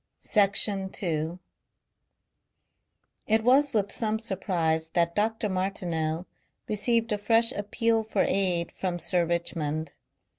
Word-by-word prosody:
Section 200 -2 +2
2 165 -3 -3 1.9
It 220 0 +2
was 270 +4 +4
with 205 -4 -1
some 220 -1 0
surprise 175 -7 -1
that 170 -1 +2
Dr. 220 +2 0
Martineau 180 -4 -2 0.4
received 230 +2 +1
a 210 - 0
fresh 230 +2 +3
appeal 225 +2 0
for 220 0 0
aid 180 -3 +1
from 180 -2 -3
Sir 170 0 +1
Richmond. 160 -2 -2
195 Hz, 110 wpm, -27 LUFS, 170-220 Hz, 1.9 s, was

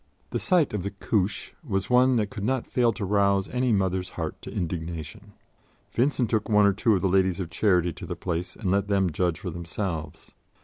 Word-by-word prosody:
The - - -1
sight 180 - +2
of 105 - -1
the 100 - -3
"Couche" 100 0 -1
was 95 -9 -1
one 125 +1 +4
that 105 -3 0
could 100 - -6
not 130 +2 0
fail 120 -2 +2
to 105 - -4
rouse 100 -1 +2
any 125 0 0
mother's 95 -3 0
heart - - -4
to - - -8
indignation. 85 +4 -5 0.6
Vincent 125 0 +1
took 110 -1 0
one 105 -1 +5
or 100 - +4
two 110 +2 +2
of 90 - -1
the - - +4
Ladies 95 -1 +2
of 85 -3 -4
Charity 90 -1 +2
to - - -9
the - - -4
place 90 0 -3
and 95 -5 -2
let 100 0 +1
them 95 -3 +2
judge 85 +1 0
for 90 - -4
themselves. 85 -2 -5
100 Hz, 210 wpm, -26 LUFS, 90-110 Hz, 0.6 s, one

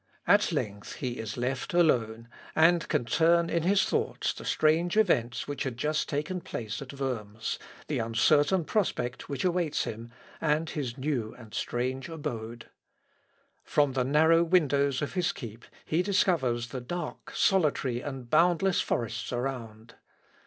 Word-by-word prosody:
At - - +4
length 105 0 -3
he 125 -3 -4
is 110 0 -5
left 130 +6 -2
alone, 115 -9 +2 0.3
and 165 +2 +4
can 120 - 0
turn 170 +6 +3
in 170 - +1
his 190 +4 +3
thoughts - - -1
the - - -10
strange 165 +5 +2
events 125 - +2
which 145 0 -5
had 130 -5 -2
just 150 +4 -1
taken 155 +5 -2
place 110 -6 -5
at 135 0 -8
Worms, 115 -5 -3 0.3
the - - -2
uncertain 145 +9 +3
prospect 135 - -1
which 140 +3 -2
awaits 175 -4 +1
him, 115 +2 -6 0.3
and 155 +1 +1
his 130 -4 -4
new 130 -5 -2
and 110 -3 -14
strange 130 +4 -2
abode. 120 -8 -5 1.0
From 145 -2 +2
the 130 -1 +1
narrow 160 +5 +4
windows 145 -5 +2
of 150 - -4
his 180 -2 +1
keep 115 -2 -9 0.2
he 160 +3 +1
discovers 150 -11 +1
the 130 +1 -5
dark, 170 +5 -6
solitary, 145 -9 +2
and 135 -3 -6
boundless 175 +6 +3
forests 115 -1 -2
around. 120 -3 -4
140 Hz, 145 wpm, -29 LUFS, 120-165 Hz, 1.0 s, At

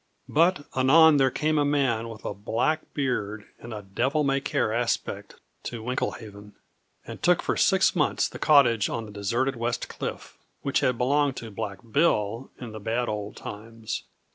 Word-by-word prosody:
But 165 0 +2
anon 150 +4 +6
there 135 -1 +4
came 155 +3 0
a - - +3
man 135 -6 +1
with 110 -2 -10
a - - -2
black 115 +10 -1
beard 110 -7 -2
and 120 - -10
a 105 -2 -6
devil 135 +10 0
may 135 -1 +1
care 110 - 0
aspect 120 0 -2 0.3
to 115 -2 -5
Winklehaven, 105 -4 -4 0.5
and - - -9
took - - +3
for - - 0
six - - +3
months - - +1
the - - -10
cottage 120 -8 +4
on 115 - -3
the 105 - -10
deserted 120 +7 -1
West 120 0 -2
Cliff, - - -6 0.2
which 140 - +1
had 125 -2 +1
belonged 140 +2 +2
to 115 -2 -7
Black 100 -1 -5
Bill 115 -5 +1
in 120 -3 -7
the 110 - -7
bad 115 +3 -1
old 105 -1 -4
times. 110 +1 -7
120 Hz, 170 wpm, -26 LUFS, 110-140 Hz, 0.5 s, anon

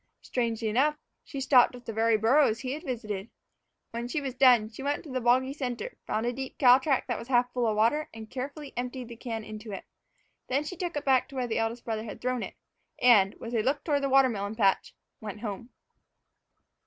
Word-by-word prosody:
Strangely 230 -2 -1
enough, 270 +8 +2 0.3
she 275 - -7
stopped 255 -2 +5
at 245 -1 -13
the 225 - -5
very 225 0 +3
burrows 225 +1 +3
he 255 -1 -3
had 300 +3 -4
visited. 225 - -4 0.6
When 235 +1 -4
she 300 +6 -2
was 270 -3 -4
done, 250 -4 +5
she 225 - -9
went 285 +1 -1
to 295 - -10
the 255 0 -2
boggy 255 +3 +3
center, 275 - -4
found 220 +2 -1
a 245 - 0
deep 265 +1 -6
cow 250 -1 +7
track 270 -1 +1
that 245 -3 -2
was 235 - -9
half 245 -1 +2
full 245 -2 +1
of 215 - +1
water, 240 +8 +2
and 220 -1 -9
carefully 275 +4 -6
emptied 250 0 -4
the 235 - -8
can 225 -2 -5
into 215 0 -8
it. 195 - -7 0.6
Then 270 +3 0
she 335 +5 -6
took 350 -3 -3
it 290 - -4
back 265 -2 +3
to 275 - -12
where 255 -1 -1
the 230 -2 -1
eldest 225 +1 -2
brother 220 -1 -2
had 210 - -8
thrown 255 -1 -1
it, - - -6 0.4
and, 210 -6 +5
with 230 - -8
a 225 - +2
look 275 +5 0
toward 290 -3 +1
the 275 - 0
watermelon 230 -6 +2
patch, 200 -4 +1 0.2
went 210 -1 -7
home. 225 +1 -5
245 Hz, 220 wpm, -28 LUFS, 225-270 Hz, 0.6 s, cow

